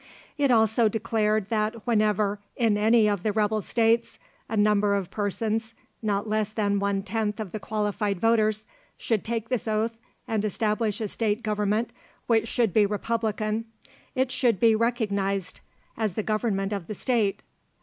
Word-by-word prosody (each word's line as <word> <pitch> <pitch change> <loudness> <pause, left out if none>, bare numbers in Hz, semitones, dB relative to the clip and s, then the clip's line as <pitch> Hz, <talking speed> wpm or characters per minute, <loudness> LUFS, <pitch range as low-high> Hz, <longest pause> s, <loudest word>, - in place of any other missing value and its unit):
It 285 -3 +2
also 220 -1 +4
declared 215 -1 0
that 215 0 -1
whenever, 210 -3 +1 0.2
in 225 -3 +2
any 220 +1 +4
of 205 -3 0
the 215 - 0
rebel 215 0 +1
states, 230 +2 +1 0.3
a 220 - -2
number 205 -1 +3
of 195 -3 -3
persons, 220 +2 -2 0.3
not 205 -1 -1
less 215 -1 0
than 205 -2 0
one 200 0 0
tenth 210 +1 -2
of 210 -5 -5
the 215 - -4
qualified 210 -1 -1
voters, 215 0 +2 0.3
should 220 -4 -1
take 230 0 -3
this 250 -3 -2
oath 220 +1 -1 0.3
and 220 -3 0
establish 215 +1 0
a 215 - -1
state 215 +2 -1
government 210 +2 0 0.3
which 225 -1 +2
should 225 -5 +1
be 210 -2 +4
republican, 215 +1 -1 0.5
it 260 0 +1
should 235 -8 +1
be 225 +1 +5
recognised 200 -5 -1 0.4
as 215 -5 -2
the 215 - -1
government 215 -2 -1
of 195 -5 -4
the 215 - -5
state. 220 -4 0
215 Hz, 160 wpm, -26 LUFS, 205-225 Hz, 0.5 s, be